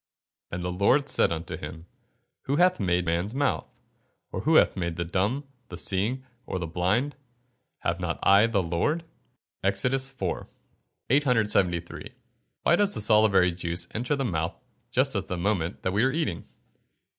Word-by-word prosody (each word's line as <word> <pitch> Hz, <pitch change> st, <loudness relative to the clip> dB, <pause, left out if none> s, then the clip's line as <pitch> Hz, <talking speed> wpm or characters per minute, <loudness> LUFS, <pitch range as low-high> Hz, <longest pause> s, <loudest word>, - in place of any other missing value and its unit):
[Verse: -, -, -5 dB
"And 90 Hz, -, -4 dB
the 90 Hz, -, -2 dB
Lord 105 Hz, +10 st, +3 dB
said -, -, +2 dB
unto 85 Hz, 0 st, -4 dB
him, 80 Hz, +1 st, -8 dB, 0.6 s
Who 140 Hz, -, 0 dB
hath 180 Hz, +3 st, +4 dB
made 90 Hz, -3 st, +1 dB
man's 85 Hz, +7 st, -1 dB
mouth? 145 Hz, +1 st, 0 dB, 0.6 s
or -, -, -3 dB
who -, -, +2 dB, 0.2 s
maketh 85 Hz, -2 st, -2 dB
the 85 Hz, -, -2 dB
dumb, 100 Hz, -, 0 dB
or -, -, -29 dB, 0.2 s
the 85 Hz, -, -7 dB
seeing, 110 Hz, +10 st, -1 dB, 0.2 s
or -, -, -2 dB
the 90 Hz, -, -3 dB
blind? 95 Hz, -, 0 dB, 0.7 s
have 85 Hz, +1 st, -1 dB
not 85 Hz, -2 st, -2 dB
I 100 Hz, +3 st, +6 dB
the 100 Hz, -5 st, +1 dB
Lord?" 90 Hz, -, 0 dB, 0.6 s
EXODUS 125 Hz, +8 st, +1 dB
IV.] 90 Hz, -4 st, -2 dB, 0.6 s
873. 105 Hz, -, +1 dB, 0.5 s
_Why 170 Hz, -, +6 dB
does 205 Hz, +2 st, +1 dB
the -, -, 0 dB
salivary 105 Hz, -4 st, +4 dB
juice 85 Hz, 0 st, -4 dB
enter 120 Hz, +6 st, -1 dB
the 135 Hz, -1 st, -1 dB
mouth 80 Hz, -6 st, -2 dB, 0.3 s
just -, -, +1 dB
at -, -, -2 dB
the 90 Hz, -, -3 dB
moment 90 Hz, -2 st, -1 dB
that 95 Hz, -, 0 dB
we 105 Hz, +3 st, +2 dB
are 130 Hz, -, +3 dB
eating? 135 Hz, -, -2 dB
100 Hz, 165 wpm, -27 LUFS, 85-130 Hz, 0.7 s, I